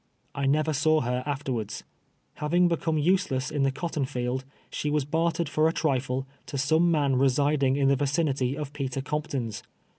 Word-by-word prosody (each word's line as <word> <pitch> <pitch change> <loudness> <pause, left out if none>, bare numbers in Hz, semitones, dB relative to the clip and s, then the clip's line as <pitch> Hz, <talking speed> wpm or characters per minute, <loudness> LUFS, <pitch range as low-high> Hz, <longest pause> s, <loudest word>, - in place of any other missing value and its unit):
I 140 -1 -1
never 155 +3 +2
saw 155 +2 +3
her 125 +1 -1
afterwards. 130 -7 -3 0.5
Having 175 +4 +2
become 165 -1 0
useless 150 -5 +1
in 145 - -1
the 135 - +3
cotton 145 0 -2
field, 130 -1 -2 0.3
she 150 - -2
was 150 -2 +1
bartered 165 +2 0
for 155 +2 +2
a - - -2
trifle, 130 -4 0 0.2
to 140 - -4
some 160 +6 +3
man 145 -5 +2
residing 135 +1 +2
in 140 -1 +2
the 140 - +4
vicinity 140 -2 0
of 150 -2 -5
Peter 135 -2 -3
Compton's. 135 -8 -3
145 Hz, 170 wpm, -27 LUFS, 130-155 Hz, 0.5 s, the